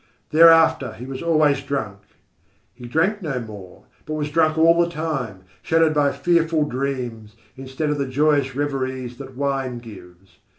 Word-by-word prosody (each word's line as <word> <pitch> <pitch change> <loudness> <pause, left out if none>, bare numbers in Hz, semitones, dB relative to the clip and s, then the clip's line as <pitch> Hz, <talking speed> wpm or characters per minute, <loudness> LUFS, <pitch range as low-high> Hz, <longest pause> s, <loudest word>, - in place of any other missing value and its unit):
Thereafter 160 -6 +5
he 120 - -9
was 130 0 -7
always 155 -4 +2
drunk. 110 -8 -4 0.7
He 120 0 -11
drank 170 - 0
no 145 -7 -3
more, 105 -5 -11 0.2
but 155 - -3
was 150 -1 -3
drunk 155 0 +2
all 165 +1 +5
the 170 - -2
time, 140 - -4 0.2
shadowed 165 -1 +2
by 145 -2 +2
fearful 165 +1 +1
dreams, 125 -5 -4 0.2
instead 135 +3 -4
of 150 - -2
the 140 - -1
joyous 140 -1 +1
reveries 130 -3 -3
that 135 -2 -10
wine 135 -3 -2
gives. 95 -5 -14
140 Hz, 155 wpm, -22 LUFS, 125-155 Hz, 0.7 s, Thereafter